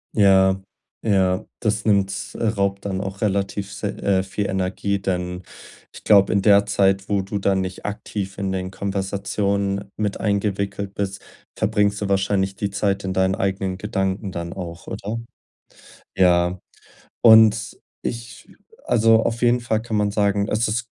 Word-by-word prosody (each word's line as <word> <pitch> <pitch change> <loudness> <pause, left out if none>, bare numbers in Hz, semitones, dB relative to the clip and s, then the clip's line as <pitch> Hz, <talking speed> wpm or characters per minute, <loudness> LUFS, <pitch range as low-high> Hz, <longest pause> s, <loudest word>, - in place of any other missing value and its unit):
Ja, 95 -2 +5 0.4
ja, 95 -4 +2 0.2
das 105 0 0
nimmt 100 -2 +3 0.2
äh, - - -5
raubt 100 -2 0
dann 95 -1 -2
auch 95 0 -6
relativ 100 -1 -1
s - - -10
äh, 100 -2 0
viel 100 +1 -3
Energie, 95 +1 -1
denn 90 -1 -3 0.5
ich - - -12
glaube, 100 -1 +5
in 100 - +2
der 100 0 +5
Zeit, 95 -1 +1
wo 100 -1 +2
du 100 +2 -4
da 100 0 +1
nicht 95 -1 -4
aktiv 100 -1 -5
in 95 -1 -1
den 95 0 -3
Konversationen 100 0 -2
mit 105 -2 -2
eingewickelt 100 -1 -2
bist, 100 0 -3 0.3
verbringst 105 -1 +1
du 100 - -2
wahrscheinlich 95 0 +1
die 100 -2 -3
Zeit 100 0 0
in 95 -1 -2
deinen 95 0 +2
eigenen 95 -1 -2
Gedanken 95 -1 -2
dann 85 -1 -5
auch, 85 -3 -8
oder? 110 +3 -4 1.0
Ja. 90 -1 +3 0.7
Und 110 -1 +6 0.3
ich 115 -1 -6 0.4
also 115 -1 +4
auf 115 0 -2
jeden 120 0 +4
Fall 110 -2 -1
kann 110 -2 -2
man 105 -1 +1
sagen, 100 -1 +1
es 110 +2 +1
ist 115 +2 -1
100 Hz, 155 wpm, -22 LUFS, 95-105 Hz, 1.0 s, Und